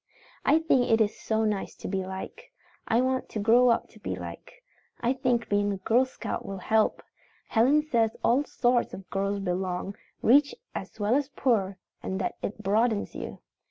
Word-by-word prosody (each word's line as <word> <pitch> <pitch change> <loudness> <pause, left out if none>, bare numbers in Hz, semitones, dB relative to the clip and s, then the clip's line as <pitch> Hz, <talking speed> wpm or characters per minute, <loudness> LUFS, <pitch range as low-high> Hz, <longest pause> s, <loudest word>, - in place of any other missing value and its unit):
"I 295 - +5
think 290 -6 +2
it 225 - +4
is 215 -1 +2
so 220 0 -1
nice 210 -2 -2
to - - -8
be 190 -1 -1
liked. 190 - -7 0.5
I 230 +2 +3
want 260 0 -1
to 215 - -4
grow 235 +4 +5
up 235 - +2
to - - -18
be - - -4
liked. - - -8 0.5
I 245 +2 +1
think 250 -3 0
being 205 0 +1
a 200 - -2
Girl 230 +7 +3
Scout 260 - -5
will 195 - -6
help. 220 +3 +1 0.5
Helen 270 +7 +4
says 230 -7 +1
all 255 +5 +3
sorts 245 -4 +1
of 190 -1 -11
girls 200 +1 0
belong, 185 +1 -2 0.3
rich 280 +4 +5 0.2
as 195 +3 -7
well 210 +2 +1
as 275 0 +1
poor, 200 -7 0 0.2
and 190 - -3
that - - -1
it 210 +1 -5
broadens 215 +2 +1
you. - - -7
225 Hz, 185 wpm, -27 LUFS, 200-250 Hz, 0.5 s, I